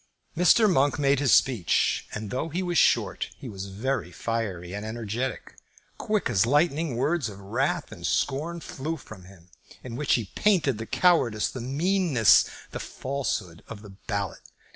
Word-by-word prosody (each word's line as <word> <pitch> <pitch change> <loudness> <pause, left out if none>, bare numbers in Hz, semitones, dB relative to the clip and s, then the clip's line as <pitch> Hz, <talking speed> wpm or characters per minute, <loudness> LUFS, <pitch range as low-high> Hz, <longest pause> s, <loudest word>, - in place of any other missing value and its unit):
Mr. 180 +6 +5
Monk 145 -7 +2
made 140 -1 +2
his 140 -3 +2
speech, 115 -11 +2
and 105 -2 -5
though 140 +6 -2
he 175 +4 -2
was 175 -1 +1
short, 100 -6 +2
he 135 - -9
was 100 -3 -6
very 105 0 -3
fiery 95 -4 -3
and 105 +1 -5
energetic. 115 +3 -4 0.5
Quick 210 -4 0
as 105 -7 +2
lightning 150 0 +2
words 145 -1 0
of 100 - -10
wrath 115 +8 -2
and - - -5
scorn 165 +5 -1
flew 155 +4 -5
from 110 - -12
him, 90 -2 -17 0.3
in 120 -2 -7
which 150 +3 +2
he 110 -5 -3
painted 160 - +2
the 110 - -6
cowardice, 130 - +2
the 130 - -6
meanness, 150 - +3 0.3
the - - -5
falsehood 130 -11 -4
of 110 -2 -9
the 105 - -11
ballot. 100 -1 -4
125 Hz, 165 wpm, -26 LUFS, 105-150 Hz, 0.5 s, Mr